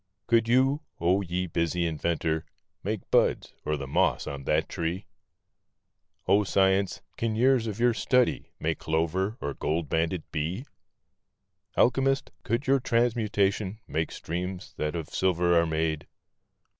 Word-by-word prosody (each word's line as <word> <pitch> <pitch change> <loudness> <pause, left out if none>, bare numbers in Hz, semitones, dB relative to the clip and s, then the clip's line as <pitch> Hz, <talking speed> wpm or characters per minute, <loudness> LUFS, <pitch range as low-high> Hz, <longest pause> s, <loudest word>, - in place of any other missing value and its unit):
Could 115 -1 +3
you, 135 +5 +3 0.2
oh, 90 +4 +3
ye 90 0 -2
busy 85 0 0
inventor, 80 0 -1 0.4
make 105 0 -2
buds, - - +2
or 75 0 -1
the 70 - -5
moss 65 - +1
on 70 -1 -6
that - - +1
tree? 85 +4 -3 1.2
Oh, 100 +3 +5
Science, 95 -1 +2
can 115 -1 -1
years 125 0 +3
of 105 0 -4
your 120 0 +4
study 125 +2 +1
make - - -1
clover 85 +7 0
or 70 - -3
gold 80 +1 -2
banded 80 +2 0
bee? 85 - -2 1.1
Alchemist, 135 +2 +2
could 115 +6 -1
your 135 +1 +4
transmutation 110 -4 +1
make 80 +1 -1
streams 90 +2 -5
that 75 +1 -2
of 80 -3 -4
silver 90 -2 +2
are 85 0 +4
made? 80 -1 -1
95 Hz, 135 wpm, -28 LUFS, 80-115 Hz, 1.2 s, Oh